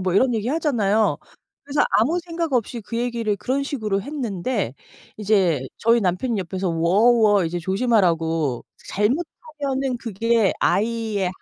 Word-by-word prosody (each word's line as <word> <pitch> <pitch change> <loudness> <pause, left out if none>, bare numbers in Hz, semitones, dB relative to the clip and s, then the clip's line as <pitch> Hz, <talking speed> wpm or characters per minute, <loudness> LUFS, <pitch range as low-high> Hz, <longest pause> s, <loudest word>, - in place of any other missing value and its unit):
뭐 185 -1 -1
이런 245 +4 +3
얘기하잖아요. 225 -4 +1 0.4
그래서 285 +1 -2 0.2
아무 300 +11 +2
생각 335 -3 -3
없이 240 -1 -1
그 230 +2 -6
얘기를 235 -3 -1
그런 260 +6 -1
식으로 215 -8 -2
했는데 235 - -3 0.4
이제 195 -8 +2 0.2
저희 230 +1 +3
남편이 200 +5 0
옆에서 190 +1 -3
"워 175 +8 +3
워." 210 -5 +4
이제 170 +2 -2
"조심하라."고. 165 - +1 0.2
"잘못 245 - 0 0.4
하면은 270 -2 -1
그게 230 -1 +1
아이의 215 -1 0
220 Hz, 310 characters per minute, -22 LUFS, 190-250 Hz, 0.4 s, 워